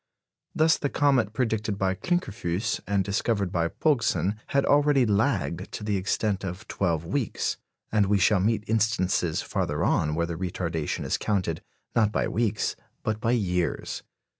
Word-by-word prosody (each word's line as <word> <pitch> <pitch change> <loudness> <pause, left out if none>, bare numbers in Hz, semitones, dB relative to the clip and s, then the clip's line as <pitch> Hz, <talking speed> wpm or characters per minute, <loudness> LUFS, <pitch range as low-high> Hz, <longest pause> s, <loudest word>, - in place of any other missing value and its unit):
Thus 160 +1 +4
the 145 - -1
comet 135 -8 +2
predicted 110 -3 -1
by 95 -1 +1
Klinkerfues 110 - -1
and 100 -1 +2
discovered 100 -1 0
by 85 -3 +1
Pogson 115 - +1
had 140 -1 +2
already 145 -3 +4
lagged 100 -2 0
to - - -5
the 105 -1 0
extent 100 +1 0
of 95 +3 -6
twelve 85 -4 -1
weeks, 115 +6 -1 0.3
and 105 -2 +3
we 100 +1 +3
shall 100 +1 +4
meet 105 +3 +1
instances 105 -7 +1
farther - - -1
on 75 0 +2
where 85 +1 +1
the 85 -1 -5
retardation 85 -3 -2
is - - 0
counted, 95 -6 -1 0.3
not 110 -3 +3
by - - 0
weeks, 110 -1 0 0.3
but 110 0 -2
by 115 - +2
years. 90 -7 -1
105 Hz, 155 wpm, -26 LUFS, 90-115 Hz, 0.3 s, Thus